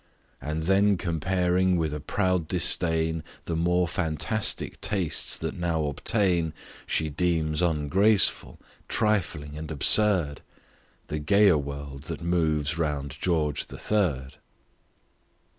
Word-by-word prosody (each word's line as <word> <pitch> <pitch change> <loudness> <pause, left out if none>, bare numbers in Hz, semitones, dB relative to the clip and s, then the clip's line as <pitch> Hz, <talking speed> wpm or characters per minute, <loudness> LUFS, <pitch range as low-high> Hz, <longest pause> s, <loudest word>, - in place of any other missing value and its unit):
And 75 +3 -3
then 100 +3 +3
comparing 90 +2 +1
with 80 -3 -1
a 75 - -4
proud 90 +2 -1
disdain 80 -1 +1 0.2
The 85 - -2
more 90 +2 +1
fantastic 85 +6 -1
tastes 95 -6 -1
that - - -4
now 85 -3 -1
obtain, 85 +1 0 0.3
She 80 - 0
deems 80 -1 0
ungraceful, 90 +6 +2 0.3
trifling 95 -9 -1
and 80 0 -7
absurd, 80 0 +3 0.6
The 75 - -4
gayer 95 +2 +4
world 70 0 -7
that 85 - -5
moves 80 -2 0
round 75 -3 -2
George 80 -5 0
the - - -10
Third. 75 -11 -1
80 Hz, 110 wpm, -26 LUFS, 75-90 Hz, 0.6 s, gayer